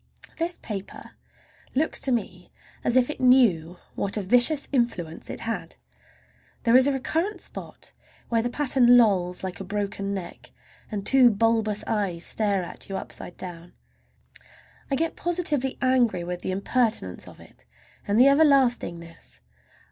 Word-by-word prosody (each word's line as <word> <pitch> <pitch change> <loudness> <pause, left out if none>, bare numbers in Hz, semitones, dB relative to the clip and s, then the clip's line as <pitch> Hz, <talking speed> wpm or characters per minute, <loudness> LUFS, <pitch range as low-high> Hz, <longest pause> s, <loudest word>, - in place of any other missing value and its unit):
This 340 +1 -2
paper 200 -3 -8 0.6
looks 310 +4 0
to 265 - +2
me 240 -2 -3 0.3
as 240 - +2
if 250 -1 +4
it 295 - -6
knew 205 -10 +3 0.2
what 200 +2 -1
a 205 - -2
vicious 245 +9 +3
influence 205 - -2
it - - -6
had! 225 0 -4 0.9
There 230 0 +3
is 260 +1 +6
a - - +3
recurrent 325 +9 -2
spot - - -9 0.3
where 230 -1 +1
the 240 - -2
pattern 250 -2 +4
lolls 185 -6 +2
like 185 -1 -5
a - - -5
broken 200 0 -3
neck 190 -3 -7 0.4
and 205 -3 -5
two 260 -2 +6
bulbous 220 -1 +1
eyes 190 -6 -2
stare 205 -4 0
at 175 - -8
you 195 - -3
upside 175 - -8
down. 175 -1 -8 1.2
I 275 - +1
get 325 +3 -1
positively 320 -7 -1
angry 245 -8 +2
with 175 0 -5
the - - -4
impertinence 200 - -1
of - - -13
it - - -17 0.4
and 205 +2 +2
the 255 - +7
everlastingness. 260 - +1
225 Hz, 150 wpm, -25 LUFS, 190-260 Hz, 1.2 s, the